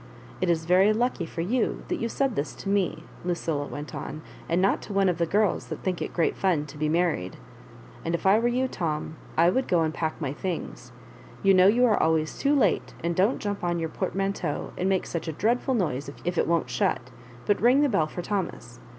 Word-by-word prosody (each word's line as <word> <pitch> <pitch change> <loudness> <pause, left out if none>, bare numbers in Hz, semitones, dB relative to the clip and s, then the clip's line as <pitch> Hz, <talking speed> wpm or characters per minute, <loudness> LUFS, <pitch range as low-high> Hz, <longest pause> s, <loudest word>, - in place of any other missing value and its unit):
It 185 - +1
is 165 -1 +1
very 185 +5 +5
lucky 225 -6 0
for 165 - -4
you 225 +7 0
that - - -2
you 230 - -1
said 270 -1 0
this 140 0 -3
10 195 - -2
m€," 180 -5 0 0.2
Lucilla 165 -4 -2
went 145 +1 -7
on, 155 - -6
" - - -19
and 170 +2 +2
not 195 +2 +2
to 205 - -7
one 195 0 +3
ofc 180 -3 +2
the 170 -1 +1
girls 210 +3 +1
that - - -6
think 185 -2 -1
it - - -3
great 170 - +1
fun 175 -6 +1
to 150 0 -11
be 155 0 +1
married. 160 - 0 0.7
And 165 +1 0
if 170 - -5
I 195 +3 +6
were 235 - +1
you, 255 +2 +1
Tom, 160 -7 -3 0.2
I 170 +2 +5
would 260 +5 0
go 175 -2 +3
and 160 0 -1
pack 160 -1 -3
my 140 -4 -2
things. 180 +3 -5 0.5
You 195 0 +6
know 185 0 +6
you 240 +5 +5
are 220 -4 +3
always 160 -1 +1
too 285 +1 +2
late; 280 - +1
and 170 0 0
don't 200 +8 +3
jump 205 -2 -4
on 175 -1 0
your 165 -1 -2
portmanteau 195 -3 -2
and 185 +2 0
make 190 -1 +1
such 170 0 -4
a - - -1
dreadful 245 - +1
noise 145 - -1 0.2
if 175 0 -1
it - - +1
won't 165 -7 +1
shut, 120 0 0 0.3
but 205 - +1
ring 250 +5 +5
the 295 - +4
bell 165 -9 +2
for 175 +3 -6
Thomas. 170 - -4
180 Hz, 230 wpm, -26 LUFS, 160-205 Hz, 0.7 s, I